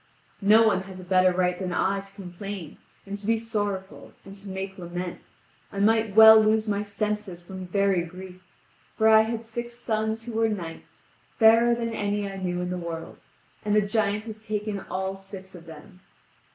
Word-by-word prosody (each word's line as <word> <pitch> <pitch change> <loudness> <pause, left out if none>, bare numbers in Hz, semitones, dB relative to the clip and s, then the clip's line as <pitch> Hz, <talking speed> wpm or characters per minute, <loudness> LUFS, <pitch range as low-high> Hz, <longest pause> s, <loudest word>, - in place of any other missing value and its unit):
No 215 +3 +6
one 200 -4 +2
has 185 -1 -9
a - - -9
better 185 0 +4
right 180 0 0
than 185 -2 -3
I 195 +2 +1
to 195 0 -12
complain, 195 -2 -8 0.3
and 200 +1 -6
to 200 - -9
be 225 0 +3
sorrowful, 205 -4 -4
and 195 0 -11
to 200 0 -10
make 190 0 -6
lament. 175 0 -6 0.4
I - - -9
might 220 0 +2
well 220 0 +10
lose 215 +1 +2
my 205 -1 0
senses 210 -3 -4
from 185 +1 -8
very 195 -1 +2
grief, 180 +2 -10 0.6
for 220 - +4
I 220 0 +7
had 225 +1 -3
six 235 +1 -6
sons 220 -1 -2
who 240 - -7
were 225 0 +2
knights, 170 -6 -7 0.3
fairer 230 +1 +6
than 230 -1 -3
any 205 -1 -1
I 195 0 -7
knew 180 -2 -2
in 180 0 -3
the 180 - -3
world, 165 -1 -7 0.4
and 210 0 +1
the 210 - +5
giant 210 0 0
has 220 -1 -9
taken 210 -1 -3
all 190 +1 -3
six 195 -1 -11
of 170 -2 -13
them. 165 +4 -13
200 Hz, 190 wpm, -26 LUFS, 185-220 Hz, 0.6 s, well